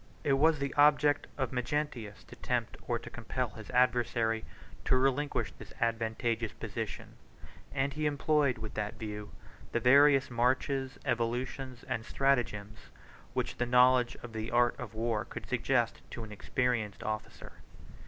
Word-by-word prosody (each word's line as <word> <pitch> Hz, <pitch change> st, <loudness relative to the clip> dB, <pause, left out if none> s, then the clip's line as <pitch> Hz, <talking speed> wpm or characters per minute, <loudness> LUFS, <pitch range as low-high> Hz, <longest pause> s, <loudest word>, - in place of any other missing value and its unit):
It 145 Hz, -3 st, +3 dB
was 155 Hz, +3 st, +4 dB
the 140 Hz, -1 st, -2 dB
object 145 Hz, 0 st, +4 dB
of 130 Hz, -4 st, -1 dB
Magnentius 125 Hz, -4 st, -3 dB
to -, -, -13 dB
tempt -, -, -1 dB
or -, -, +1 dB
to -, -, -12 dB
compel -, -, -3 dB
his -, -, -11 dB
adversary 120 Hz, -2 st, +2 dB, 0.4 s
to 130 Hz, -, +4 dB
relinquish 135 Hz, +2 st, +1 dB
this -, -, -13 dB
advantageous 115 Hz, 0 st, 0 dB
position; -, -, -6 dB, 0.5 s
and 140 Hz, 0 st, 0 dB
he 150 Hz, +1 st, 0 dB
employed, 145 Hz, -2 st, +2 dB
with 110 Hz, -1 st, -6 dB
that 105 Hz, +1 st, -3 dB
view, 105 Hz, -2 st, -6 dB, 0.4 s
the 120 Hz, -, +2 dB
various 140 Hz, +2 st, +6 dB
marches, 130 Hz, +2 st, 0 dB
evolutions, 125 Hz, +2 st, -2 dB
and 110 Hz, -, -2 dB
stratagems, 115 Hz, -6 st, 0 dB, 0.6 s
which -, -, -1 dB
the 120 Hz, -, 0 dB
knowledge 125 Hz, 0 st, +5 dB
of 120 Hz, -2 st, -8 dB
the 110 Hz, +1 st, -3 dB
art 120 Hz, -1 st, +3 dB
of -, -, -7 dB
war 110 Hz, -1 st, 0 dB
could -, -, -8 dB
suggest 125 Hz, -1 st, +1 dB
to 115 Hz, -, -6 dB
an 110 Hz, -, -9 dB
experienced 110 Hz, -1 st, -1 dB
officer. 110 Hz, 0 st, -5 dB
125 Hz, 145 wpm, -31 LUFS, 115-135 Hz, 0.6 s, various